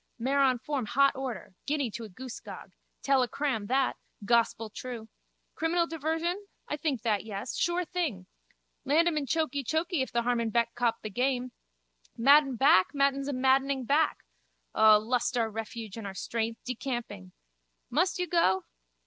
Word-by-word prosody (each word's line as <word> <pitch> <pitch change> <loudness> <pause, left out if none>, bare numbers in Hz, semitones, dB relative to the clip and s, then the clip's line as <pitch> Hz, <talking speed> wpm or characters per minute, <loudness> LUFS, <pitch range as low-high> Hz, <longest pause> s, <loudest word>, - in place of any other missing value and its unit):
Mare 265 +4 0
on 260 -2 +4
form 260 -2 -3
hot 275 +4 +3
order. 255 -9 -5
Guinea 285 -5 0
to 220 +3 -6
a - - -10
goosegog. 255 +6 -9 0.3
Tell 275 -1 +3
a 250 - +1
cram, 255 -7 -2
that. 265 +2 +1 0.3
Gospeltrue. 230 0 -1 0.4
Criminal 335 +1 +1
diversion? 330 +5 -2 0.2
I - - -2
think 285 -6 -2
that 215 -4 +1
yes. 210 +2 -5
Sure 345 +1 0
thing. 310 - -3 0.6
Land 310 +5 +3
him 340 - +1
in 290 -2 -1
chokeechokee 315 - 0
if 260 - -3
the 235 0 0
harman 235 -1 0
beck 235 +1 +1
copped 240 -2 0
the 215 - -5
game. 250 +2 0 0.7
Madden 275 +2 +5
back 265 0 +4
Madden's 275 0 +1
a 285 - -2
maddening 265 0 +2
back. 295 +5 +1 0.5
O 215 -1 +7
lust 245 +3 -1
our 225 -2 0
refuge 220 -1 -6
and 220 -3 -5
our 195 - -7
strength. 225 +2 -3
Decamping. 240 - -5 0.6
Must 355 +9 +1
you 360 - 0
go? 310 - +2
255 Hz, 155 wpm, -29 LUFS, 230-290 Hz, 0.7 s, O